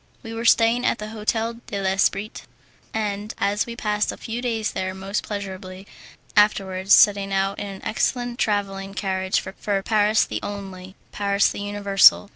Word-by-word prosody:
We 225 - -7
were 230 +1 -4
staying 230 +1 +4
at 250 - +1
the 210 0 -6
"Hotel 225 +1 -2
de 200 - -4
l'Esprit," 195 +2 0 0.5
and 210 -1 -3 0.3
we 235 - -6
passed 210 -2 0
a - - -9
few 235 +1 -5
days 225 -3 -1
there 185 0 -3
most 195 +2 -3
pleasurably, 190 -2 -7 0.5
afterwards 195 -2 +2
setting 200 -1 +6
out 195 0 0
in 205 - -4
an 195 -1 -8
excellent 245 +2 -1
travelling 195 -2 -1
carriage 190 -1 0
for 195 +1 -3
Paris 215 0 +3
the - - -4
Only, 190 -2 -7 0.2
Paris 200 0 +2
the - - -6
Universal. 200 0 +4
205 Hz, 155 wpm, -23 LUFS, 195-220 Hz, 0.5 s, setting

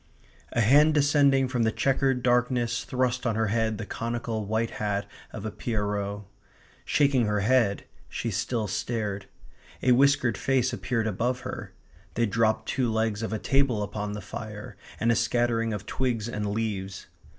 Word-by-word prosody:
A 120 - +2
hand 145 +7 +5
descending 140 -2 +4
from 125 -2 -1
the 110 -1 +3
chequered 135 0 +1
darkness 120 -1 +1
thrust 125 0 0
on 115 - 0
her 110 -1 +1
head 110 0 0
the 115 - -5
conical 115 -1 -3
white 110 +2 0
hat 100 -1 -1 0.3
of 110 -1 -7
a 110 - -3
pierrot. 105 -2 -2 0.6
Shaking 140 -6 +3
her 105 -1 +1
head, 115 -2 +2 0.3
she 115 - -3
still 110 +3 -1
stared. 105 -1 -3 0.6
A 130 - +4
whiskered 135 -3 +3
face 130 -1 +1
appeared 115 -3 -1
above 120 +5 -1
her. - - -7 0.4
They 120 - +2
dropped 110 0 +1
two 125 -4 0
legs 110 -1 0
of 110 - -3
a 110 - -1
table 130 -3 +1
upon 105 +1 -4
the 105 - -5
fire 105 +2 -8 0.2
and 115 +1 +3
a - - +3
scattering 115 -1 +1
of 105 -2 -4
twigs 120 -4 -1
and 105 -3 -3
leaves. 100 -3 -3
115 Hz, 160 wpm, -27 LUFS, 105-125 Hz, 0.6 s, hand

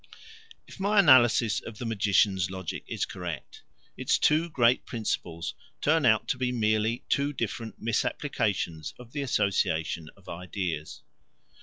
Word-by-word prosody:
If - - -14
my 205 +2 +1
analysis 120 - +6
of 110 -2 -10
the 120 - -5
magician's 100 -3 +2
logic 95 -3 -5
is - - -2
correct, 90 -3 -7 0.3
its - - +1
two 160 +3 +2
great 125 -5 +3
principles 90 -7 -3 0.3
turn 155 -2 +3
out 110 -1 +3
to 130 - -1
be 125 -1 0
merely 110 0 +1
two 140 +1 +1
different 115 -2 -4
misapplications 105 - -1
of 125 -1 -13
the 145 - -3
association 85 - 0
of 100 - -22
ideas. 85 -2 -5
110 Hz, 135 wpm, -28 LUFS, 95-125 Hz, 0.3 s, analysis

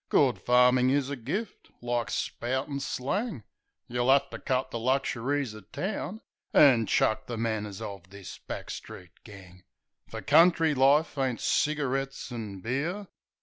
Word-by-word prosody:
Good 135 -4 +3
farmin' 125 +1 +4
is 140 0 +1
a - - -2
gift 195 - -5
— - - -40
like 120 -3 0
spoutin' 130 +6 -2
slang. 150 - -3 0.4
Yeh'll 120 +1 -1
'ave 140 +1 +4
to - - -7
cut 130 -1 -1
the 115 - -3
luxuries 130 0 0
o' 110 - -10
town, 195 - -5 0.3
An' 120 -7 +6
chuck 110 - +1
the 120 - -4
manners 110 -3 -3
of 95 -3 -8
this 100 -1 -10
back - - -7
street 90 -2 -9
gang; 95 -3 -13 0.5
Fer - - -6
country 165 -2 +5
life 140 +3 +3
ain't 130 -3 0
cigarettes 135 -3 -1
and 105 -5 -6
beer." 165 - -3
130 Hz, 145 wpm, -28 LUFS, 115-145 Hz, 0.5 s, An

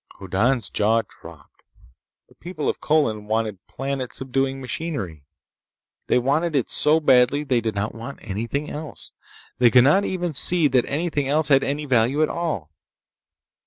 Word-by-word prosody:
Hoddan's 100 +2 0
jaw 110 +2 +2
dropped. 80 -4 -15 0.7
The - - -23
people 170 -3 -6
of - - -2
Colin 115 -9 0
wanted 110 -3 -2
planet 135 -1 -4
subduing 135 0 -2
machinery. 115 - -5 0.8
They - - +3
wanted 145 +6 0
it 130 - 0
so 150 +2 +3
badly 135 -1 +4
that 150 - -17
they 125 -2 +2
did 110 -2 -3
not 100 +2 -2
want 115 +4 -8
anything 115 +8 -4
else. 150 0 -8 0.5
They 125 -1 +6
could 125 0 +6
not 170 +9 +4
even 180 -4 -3
see 165 +3 +4
that 125 -2 +2
anything 150 -2 -2
else 150 +1 +1
had 135 -1 +5
any 145 +2 -2
value 130 +3 +2
at - - 0
all. 150 - -3
135 Hz, 160 wpm, -22 LUFS, 115-150 Hz, 0.8 s, They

